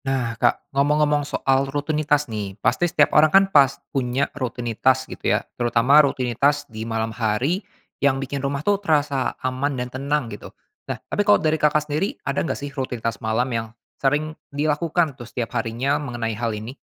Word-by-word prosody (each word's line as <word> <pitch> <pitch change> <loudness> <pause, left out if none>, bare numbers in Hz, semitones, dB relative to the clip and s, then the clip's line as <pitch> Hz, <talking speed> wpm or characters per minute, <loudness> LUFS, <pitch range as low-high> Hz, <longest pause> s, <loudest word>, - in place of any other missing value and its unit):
Nah 130 -4 -1
Kak, 120 - +2
ngomong-ngomong 150 +1 +2
soal 135 -1 0
rutinitas 145 +1 0
nih, 105 -5 -5
pasti 150 +11 +1
setiap 145 -2 +3
orang 155 +1 +6
kan 195 +5 +6
pas 140 -2 +5 0.2
punya 130 +1 0
rutinitas 130 0 0
gitu - - -4
ya. - - -7
Terutama 120 +5 +4
rutinitas 140 +1 +1
di 110 -2 -7
malam 110 0 -2
hari, 120 - 0 0.4
yang 140 -1 +3
bikin 135 +1 -4
rumah 140 +2 -3
tuh 205 -1 +2
terasa 145 -6 0
aman 130 +2 -1
dan 125 0 -4
tenang 140 +1 -1
gitu. 105 - -9 0.4
Nah, - - -2
tapi - - -1
kalau 205 0 +5
dari 155 -1 0
Kakak 150 0 +3
sendiri 170 - -2
ada 140 - 0
nggak - - -2
sih 140 -1 -7
rutinitas 125 -4 -3
malam 110 +3 +1
yang 115 -1 -2 0.3
sering 150 +3 +1 0.2
dilakukan 155 +2 0
tuh 120 -3 -11
setiap 120 -1 -4
harinya 130 +6 -1
mengenai 120 -5 -3
hal 115 +2 -2
ini? 110 +4 -7
135 Hz, 175 wpm, -22 LUFS, 120-150 Hz, 0.4 s, orang